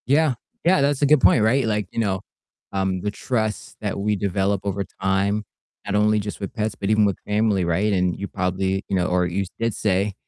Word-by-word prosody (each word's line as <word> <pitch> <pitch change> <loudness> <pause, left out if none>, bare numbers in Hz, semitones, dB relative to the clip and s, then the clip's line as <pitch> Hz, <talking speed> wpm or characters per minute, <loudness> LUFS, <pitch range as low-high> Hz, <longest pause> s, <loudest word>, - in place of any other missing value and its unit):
Yeah, 145 +1 +3 0.3
yeah, 175 -4 +4
that's 140 0 +1
a - - +5
good 145 -1 +5
point, 110 - +5
right, 130 +4 +3
like, 105 -3 -1
you - - -4
know, 95 -4 0 0.5
um, 95 -1 0
the 105 - -2
trust 110 -1 -3
that 105 -2 -2
we 105 +1 +1
develop 100 0 0
over 100 0 -2 0.2
time, 100 +2 +1 0.4
not 100 - -2
only 105 +1 +3
just 105 0 -5
with 100 - -5
pets, 110 -1 -2
but 100 - -3
even 110 -1 +4
with 100 -2 0
family, 105 -3 +2
right, 95 +5 +1
and 90 -2 +1
you 100 - -4
probably, 95 +1 -1
you 100 - -1
know, 90 -1 +1
or 90 0 +2
you 95 +3 -1
did 115 -1 0
say, 100 0 0
100 Hz, 215 wpm, -23 LUFS, 95-110 Hz, 0.5 s, a